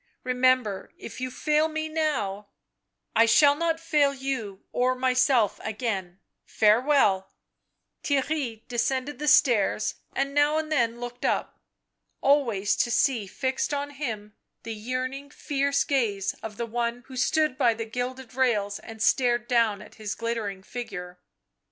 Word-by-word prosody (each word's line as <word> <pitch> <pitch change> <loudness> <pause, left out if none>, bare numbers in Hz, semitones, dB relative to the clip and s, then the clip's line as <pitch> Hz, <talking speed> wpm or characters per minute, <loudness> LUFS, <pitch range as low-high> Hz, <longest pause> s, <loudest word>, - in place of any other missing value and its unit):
" - - -44
Remember, 255 -5 +1
if - - -9
you 255 - -2
fail 300 +4 +1
me 315 0 -3
now 250 -11 -2 0.2
" - - -56
" - - -57
I 230 - +6
shall 285 +5 +6
not 325 +2 -1
fail 300 -4 +2
you 255 -8 -4
or 255 +1 +1
myself 255 -3 +2
again 200 -5 -3
— - - -56
farewell." 215 -3 +3 0.7
Theirry 270 -5 -1
descended 255 +3 -1
the 300 - -3
stairs 230 -8 +4 0.2
and 275 +1 -1
now 290 +1 +3
and 315 0 -3
then 235 -5 +1
looked 245 0 -7
up. - - -1 0.6
Always 235 -9 +2
to - - +1
see 235 -3 +1
fixed 265 +6 -2
on 285 0 -3
him 220 -7 -5 0.3
the 225 - -5
yearning, 255 +5 -4
fierce 280 -1 0
gaze 215 -8 0
of 215 -2 -7
the 235 - -2
one 235 +1 -2
who 265 - -11
stood 305 +2 +1
by 235 -3 +3
the 225 0 -4
gilded 250 +1 -5
rails 215 -6 +1
and 225 -1 -6
stared 240 +1 +2
down 225 -4 +2
at - - -16
his 210 -1 -3
glittering 225 -4 -3
figure. 180 -7 -7
245 Hz, 150 wpm, -26 LUFS, 220-275 Hz, 0.7 s, I